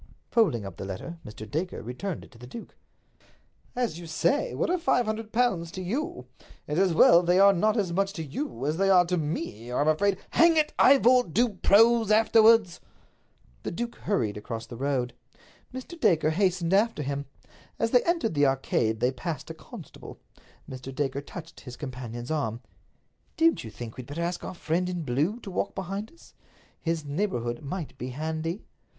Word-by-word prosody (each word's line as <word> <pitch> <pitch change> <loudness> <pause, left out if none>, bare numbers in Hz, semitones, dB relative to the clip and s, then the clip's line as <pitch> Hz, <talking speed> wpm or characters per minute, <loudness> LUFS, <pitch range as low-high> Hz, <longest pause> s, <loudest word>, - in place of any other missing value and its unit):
Folding 185 - +2
up 95 -2 -8
the - - -6
letter, 100 - -6
Mr. 110 0 -9
Dacre 165 - -3
returned 145 - -5
it - - -16
to 115 - -17
the 125 - -10
duke. 230 - -10 1.0
"As 240 -9 -1
you 170 - -9
say, 280 - 0
what - - 0
are 365 - +1
five 250 -7 +2
hundred 215 0 -4
pounds 225 -9 +1
to 185 - -5
you? 200 - -3 0.4
It's 150 +3 -1
as 190 -2 +3
well 170 +1 +7
they 175 +1 +2
are 200 +1 +7
not 215 +5 +2
as 190 -5 0
much 195 +2 +1
to 165 - -5
you 140 - -5
as 155 +2 0
they 195 +1 +2
are 180 -2 +6
to 180 +1 0
me, 150 -8 -4
or 125 - -1
I'm 145 - +2
afraid—" 190 +5 +2
"Hang 330 -1 +5
it, 305 -1 +2
Ivor, 255 -2 +6
do 240 +7 +3
prose 225 +3 +4
afterwards!" 220 -3 +5 0.8
The - - -4
duke 235 +6 -4
hurried 110 - -1
across 115 +2 -6
the 120 - -9
road. 130 -1 -1 0.6
Mr. 260 +7 -8
Dacre 165 - +3
hastened 180 0 +1
after 205 -5 +2
him. 140 +1 -3 0.5
As 230 - 0
they 250 - +5
entered 335 - 0
the 145 -2 +4
Arcade 115 -4 0
they 125 +1 +3
passed 155 +1 -5
a - - -6
constable. - - -12 0.5
Mr. 130 0 -8
Dacre 140 0 -1
touched 160 +3 -10
his 125 -2 -10
companion's 125 -2 -6
arm. 120 -7 -2 0.8
"Don't 330 0 +3
you 110 - -7
think 110 +2 -9
we'd 125 -2 -8
better 160 +4 -4
ask 175 +1 -3
our - - -6
friend 175 +2 -1
in 175 -2 -3
blue 150 - 0
to 195 - -8
walk 185 - -2
behind 195 +3 -4
us? 335 - -19 0.5
His 165 -2 -2
neighborhood 140 - -2
might 155 +2 -5
be 125 - -4
handy." 160 - -4
170 Hz, 185 wpm, -27 LUFS, 135-215 Hz, 1.0 s, well